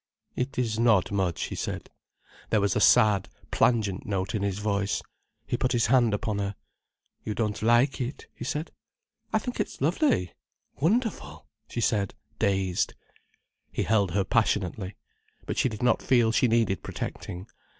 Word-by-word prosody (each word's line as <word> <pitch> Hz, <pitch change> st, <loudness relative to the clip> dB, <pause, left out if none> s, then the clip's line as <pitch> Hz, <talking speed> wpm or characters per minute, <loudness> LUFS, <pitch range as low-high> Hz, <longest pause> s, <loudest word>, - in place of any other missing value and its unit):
"It 125 Hz, +2 st, -3 dB
is 115 Hz, -3 st, 0 dB
not 115 Hz, -6 st, +4 dB
much," 95 Hz, -4 st, 0 dB
he -, -, -4 dB
said. -, -, -4 dB, 0.6 s
There 110 Hz, -, +3 dB
was 100 Hz, -2 st, +1 dB
a -, -, +2 dB
sad, 105 Hz, -3 st, +5 dB, 0.2 s
plangent 110 Hz, -5 st, +2 dB
note 95 Hz, -2 st, -2 dB
in 110 Hz, -, -1 dB
his 100 Hz, -1 st, -1 dB
voice. 100 Hz, -1 st, -1 dB, 0.4 s
He -, -, -1 dB
put 130 Hz, -, 0 dB
his 115 Hz, -2 st, +3 dB
hand 120 Hz, -4 st, +5 dB
upon 105 Hz, 0 st, -1 dB
her. 100 Hz, 0 st, -2 dB, 0.7 s
"You 105 Hz, -, -3 dB
don't 105 Hz, -2 st, -1 dB
like 120 Hz, +5 st, +3 dB
it?" 125 Hz, +3 st, -4 dB
he -, -, -8 dB
said. 150 Hz, +5 st, -3 dB, 0.6 s
"I 220 Hz, -, +3 dB
think 245 Hz, +3 st, -4 dB
it's -, -, -3 dB
lovely—wonderful," 180 Hz, -, -1 dB, 0.2 s
she 120 Hz, -, -3 dB
said, 105 Hz, -3 st, 0 dB, 0.2 s
dazed. 95 Hz, -2 st, +1 dB, 0.8 s
He -, -, -1 dB
held 105 Hz, -3 st, +2 dB
her 100 Hz, 0 st, +2 dB
passionately. 100 Hz, -3 st, 0 dB, 0.5 s
But -, -, -2 dB
she 130 Hz, -, +3 dB
did 110 Hz, 0 st, -6 dB
not 125 Hz, -, +3 dB
feel 120 Hz, -3 st, +3 dB
she 125 Hz, -, +3 dB
needed 110 Hz, -5 st, +2 dB
protecting. 90 Hz, +2 st, -6 dB
110 Hz, 155 wpm, -27 LUFS, 100-125 Hz, 0.8 s, sad